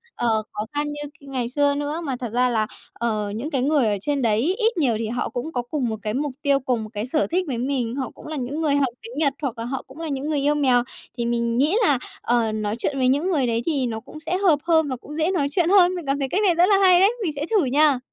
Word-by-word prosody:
ờ, 240 Hz, -, -1 dB, 0.3 s
khó 210 Hz, -, -3 dB
khăn 295 Hz, 0 st, 0 dB
như 295 Hz, 0 st, -5 dB, 0.2 s
k -, -, -40 dB
ngày 250 Hz, -3 st, -2 dB
xưa 285 Hz, +2 st, +2 dB
nữa. 290 Hz, +3 st, -3 dB
Mà 270 Hz, -3 st, -2 dB
thật 245 Hz, -, -4 dB
ra 250 Hz, +1 st, +3 dB
là, 220 Hz, -3 st, +1 dB, 0.3 s
ờ, 215 Hz, -3 st, -2 dB
những 250 Hz, +8 st, -4 dB
cái 275 Hz, -5 st, 0 dB
người 280 Hz, -2 st, +2 dB
ở 205 Hz, -1 st, +1 dB
trên 285 Hz, +4 st, -1 dB
đấy 220 Hz, -3 st, +2 dB, 0.2 s
ít 455 Hz, -2 st, +1 dB
nhiều 265 Hz, -8 st, +2 dB
thì 225 Hz, -, -2 dB
họ 240 Hz, +2 st, -2 dB
cũng 250 Hz, +6 st, -4 dB
có 245 Hz, -, 0 dB
cùng 250 Hz, +1 st, -2 dB
một 220 Hz, -, -2 dB
cái 210 Hz, -1 st, -3 dB
mục 285 Hz, +3 st, -1 dB
tiêu, 280 Hz, -1 st, +3 dB
cùng 250 Hz, -4 st, -1 dB
một 215 Hz, -, -8 dB
cái 210 Hz, +2 st, -3 dB
sở 305 Hz, +4 st, +1 dB
thích 365 Hz, +2 st, +2 dB
với 255 Hz, -4 st, -2 dB
mình, 245 Hz, -1 st, -1 dB
họ 265 Hz, -2 st, -3 dB
cũng -, -, -13 dB
là 310 Hz, -, -4 dB
những 280 Hz, +3 st, -3 dB
người 295 Hz, -3 st, +2 dB
học 285 Hz, -1 st, +3 dB
tiếng 230 Hz, +2 st, -10 dB
Nhật 290 Hz, -3 st, +2 dB
hoặc 260 Hz, -5 st, -3 dB
là 230 Hz, -, -4 dB
họ 265 Hz, +2 st, -4 dB
cũng 265 Hz, +4 st, -13 dB
là 330 Hz, -, -4 dB
những 280 Hz, +1 st, -3 dB
người 300 Hz, -2 st, +1 dB
yêu 290 Hz, +2 st, +2 dB
mèo, 255 Hz, -4 st, +3 dB, 0.3 s
thì 235 Hz, -, -1 dB
mình 235 Hz, 0 st, 0 dB
nghĩ 295 Hz, +9 st, +3 dB
là, 285 Hz, -, +3 dB, 0.2 s
ờ, 235 Hz, -2 st, +1 dB
nói 215 Hz, 0 st, -2 dB
chuyện 275 Hz, +3 st, -1 dB
với 255 Hz, -1 st, +2 dB
những 290 Hz, +8 st, +2 dB
người 280 Hz, -7 st, +1 dB
đấy 230 Hz, 0 st, 0 dB
thì 285 Hz, -6 st, 0 dB
nó 225 Hz, -2 st, -3 dB
cũng 305 Hz, +7 st, -12 dB
sẽ 330 Hz, +3 st, -2 dB
hợp 360 Hz, -7 st, +3 dB
hơn 320 Hz, -3 st, +3 dB
và 260 Hz, -, -2 dB
cũng 285 Hz, +4 st, -10 dB
dễ 320 Hz, +3 st, +1 dB
nói 310 Hz, -7 st, +1 dB
chuyện 340 Hz, +1 st, +2 dB
hơn. 370 Hz, -2 st, +5 dB
Mình 350 Hz, -3 st, -6 dB
cảm 275 Hz, +1 st, 0 dB
thấy 270 Hz, -1 st, -1 dB
cách 385 Hz, -, +1 dB
này 365 Hz, -4 st, +4 dB
rất 345 Hz, +2 st, +5 dB
là 400 Hz, -, +5 dB
hay 365 Hz, -2 st, +6 dB
đấy, 395 Hz, +5 st, +5 dB
mình 335 Hz, -, 0 dB
sẽ 285 Hz, +1 st, -2 dB
thử 415 Hz, -8 st, +3 dB
nha. 280 Hz, +1 st, +3 dB
275 Hz, 300 wpm, -23 LUFS, 240-310 Hz, 0.3 s, hay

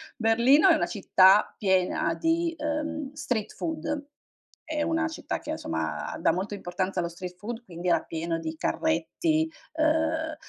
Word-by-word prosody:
Berlino, 245 Hz, +8 st, +5 dB
è 335 Hz, -, +7 dB
una 310 Hz, -, +1 dB
città 195 Hz, -1 st, +4 dB
piena 185 Hz, -3 st, +1 dB
di, 330 Hz, -, 0 dB
ehm, 300 Hz, -1 st, -3 dB
street-food 290 Hz, +3 st, -3 dB, 0.6 s
è 305 Hz, -1 st, -2 dB
una 320 Hz, +1 st, +1 dB
città 320 Hz, -, -4 dB
che, -, -, -10 dB
insomma, -, -, -3 dB
dà -, -, +4 dB
molto 190 Hz, +4 st, -3 dB
importanza 185 Hz, -1 st, -2 dB
allo 170 Hz, -, -2 dB
street-food 185 Hz, +7 st, -7 dB
quindi, 175 Hz, -1 st, -4 dB
era 170 Hz, -, +4 dB
pieno 165 Hz, 0 st, -3 dB
di 160 Hz, 0 st, -5 dB
carretti, 315 Hz, -, 0 dB, 0.3 s
uhm, 315 Hz, 0 st, +1 dB
265 Hz, 135 wpm, -27 LUFS, -, 0.6 s, è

